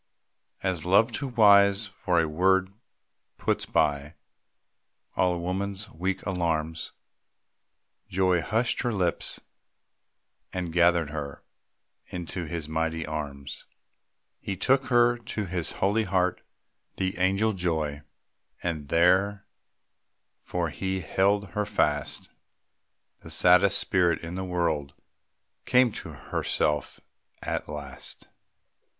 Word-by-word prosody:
As 90 -4 -1
love, 100 +6 +4
too 140 +4 -3
wise 100 -3 +5
for 90 -3 0
a 80 - +2
word, 95 +4 +2 0.6
puts - - -1
by 75 0 0 1.0
All 90 -1 +2
a - - -3
woman's 95 +3 -3
weak 95 +4 -3
alarms, 80 -4 -1 1.2
Joy 90 -2 +2
hushed 115 +7 0
her 120 - 0
lips, 90 -6 -1 1.1
and 90 -3 -4
gathered 85 -3 +3
her 75 -2 -6 0.6
Into 90 0 -5
his 80 -1 -5
mighty 80 +1 -1
arms. 75 -3 -6 0.7
He 95 - -4
took 130 +6 +2
her 120 -1 +4
to 115 -3 -4
his 90 -2 -3
holy 105 +3 +1
heart, 90 -1 +1 0.6
And 85 -5 -2
there 95 +4 +3 0.9
for 85 -2 -2
he 95 +2 -2
held 100 +4 +1
her 105 +4 -1
fast 75 -8 0 0.9
The - - -12
saddest 90 +2 +5
spirit 90 -5 +2
in 85 +1 -6
the 95 +1 -3
world, 80 -6 -1 0.7
Came 125 -2 +4
to - - -7
herself 75 -2 -2 0.4
at - - -3
last. 75 -2 -8
90 Hz, 105 wpm, -27 LUFS, 80-100 Hz, 1.2 s, wise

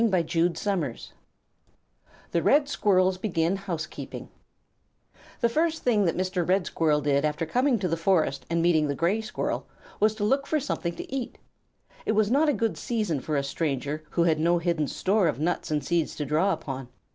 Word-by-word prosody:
THE 170 - 0 1.3
RED 285 - +4
SQUIRRELS 185 -8 +2
BEGIN 170 -3 0
HOUSEKEEPING 175 -5 -6 1.1
The 235 - +4
first 320 +5 0
thing 215 -5 +3
that 170 - 0
Mr. 185 -2 -1
Red 190 -1 +3
Squirrel 150 -2 +1
did 140 0 +1
after 150 +2 -1
coming 250 - +2
to 190 -3 -1
the 165 - 0
forest 165 -6 +1
and 170 0 +1
meeting 160 -3 +3
the 140 - -1
Gray 185 +9 +1
Squirrel 220 - -3 0.3
was 215 +1 +3
to 210 - -3
look 270 +6 +1
for 310 - +1
something 180 -11 -3
to - - -8
eat. 255 -3 -4 0.7
It - - +2
was 215 0 +2
not 295 +4 +4
a - - +3
good 225 -3 -1
season 210 - -1
for 150 +4 -3
a 140 - 0
stranger 145 +1 -2
who 170 - +1
had 160 -2 +2
no 170 +2 +3
hidden 170 -3 0
store 195 +3 +1
of 150 - -1
nuts 170 +4 -1
and 150 -1 -1
seeds 170 -2 0
to 150 - -3
draw 155 +8 +2
upon. 135 -7 -4
175 Hz, 180 wpm, -26 LUFS, 155-215 Hz, 1.3 s, RED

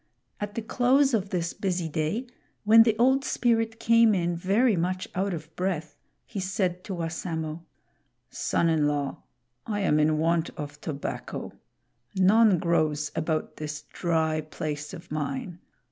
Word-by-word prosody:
At 205 0 -5
the 230 - -3
close 265 +4 +3
of 200 -3 0
this 170 -3 -2
busy 180 -4 -2
day, 160 - -2 0.4
when 225 +2 +8
the 225 -1 +4
Old 265 +3 +4
Spirit 225 -3 +1
came 230 -1 +5
in 175 -1 0
very 205 +7 +2
much 185 +4 -1
out 195 +2 -1
of 160 -2 -7
breath, 165 -5 -2 0.3
he 210 - -6
said 185 -1 -1
to 195 - -4
Wassamo: 165 -1 -4 0.7
"Son 170 - 0
in 160 -3 +2
law, 145 -2 -2 0.5
I 205 -2 -1
am 155 -6 +3
in 155 0 +3
want 165 +1 +1
of 145 -1 -7
tobacco. 145 -3 -5 0.6
None 200 +1 +5
grows 155 -3 0
about 160 -1 -2
this 150 -1 -5
dry 160 -2 0
place 150 -1 -5
of 170 -1 -13
mine. 155 +3 -3
175 Hz, 145 wpm, -27 LUFS, 155-210 Hz, 0.7 s, when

